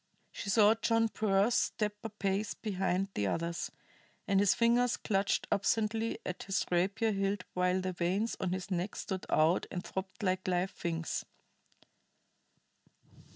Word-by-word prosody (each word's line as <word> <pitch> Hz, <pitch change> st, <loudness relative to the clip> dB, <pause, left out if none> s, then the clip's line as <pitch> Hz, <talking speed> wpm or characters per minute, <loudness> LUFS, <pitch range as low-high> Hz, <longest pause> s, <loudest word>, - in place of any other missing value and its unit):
She 200 Hz, -, -6 dB
saw 210 Hz, +1 st, +6 dB
John 225 Hz, 0 st, +2 dB
Pearse 210 Hz, +1 st, +2 dB
step 210 Hz, -2 st, +1 dB
a 225 Hz, -, -3 dB
pace 200 Hz, 0 st, -1 dB
behind 195 Hz, -2 st, -1 dB
the 100 Hz, -, 0 dB
others, 170 Hz, -, -2 dB, 0.6 s
and 195 Hz, -1 st, +3 dB
his 200 Hz, -1 st, +4 dB
fingers 240 Hz, +1 st, +3 dB
clutched 195 Hz, -2 st, 0 dB
absently 225 Hz, +2 st, +1 dB
at 180 Hz, -, -4 dB
his 195 Hz, -1 st, -1 dB
rapier 195 Hz, +6 st, +2 dB
hilt 195 Hz, -1 st, -1 dB
while 180 Hz, +1 st, +1 dB
the 185 Hz, 0 st, -2 dB
veins 185 Hz, +6 st, 0 dB
on 185 Hz, -, -1 dB
his 185 Hz, +1 st, -4 dB
neck 180 Hz, +2 st, -1 dB
stood 190 Hz, -1 st, -4 dB
out 160 Hz, +3 st, +3 dB
and 180 Hz, -1 st, -4 dB
throbbed 190 Hz, +2 st, -6 dB
like 185 Hz, -1 st, 0 dB
live 180 Hz, +1 st, +1 dB
things. 165 Hz, -2 st, -3 dB
195 Hz, 145 wpm, -32 LUFS, 185-215 Hz, 0.6 s, saw